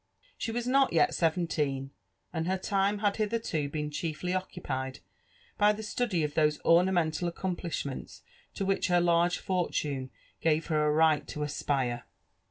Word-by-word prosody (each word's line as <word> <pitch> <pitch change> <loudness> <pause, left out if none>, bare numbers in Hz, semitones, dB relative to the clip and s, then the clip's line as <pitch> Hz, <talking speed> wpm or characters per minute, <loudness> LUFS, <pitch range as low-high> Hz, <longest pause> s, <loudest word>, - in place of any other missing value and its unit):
She 225 - -3
was 240 +1 -2
not 270 -1 +3
yet 165 - +4
seventeen, 155 -5 0 0.4
and 165 -1 -2
her 190 +1 +1
time 200 +2 +1
had 200 - +2
hitherto 215 -9 -1
i)eeQ 150 0 -3
chiefly 165 +3 -3
occupied 135 -8 -3 0.6
by 210 +1 +5
the 215 +1 -6
study 210 -6 0
of 150 -1 -2
those 150 -1 +3
ornan)ental 175 -1 +3
accoRipli^XQcnli 170 -6 -4 0.3
t^ 195 - -2
which 195 0 +1
her 175 -1 +4
large 175 0 +3
fortune 150 -7 -1 0.3
gave 160 0 +2
her 155 -2 +1
9 150 - +2
right 155 -1 +3
tp 150 - -5
aapire. 135 -4 -1
170 Hz, 150 wpm, -30 LUFS, 150-190 Hz, 0.6 s, by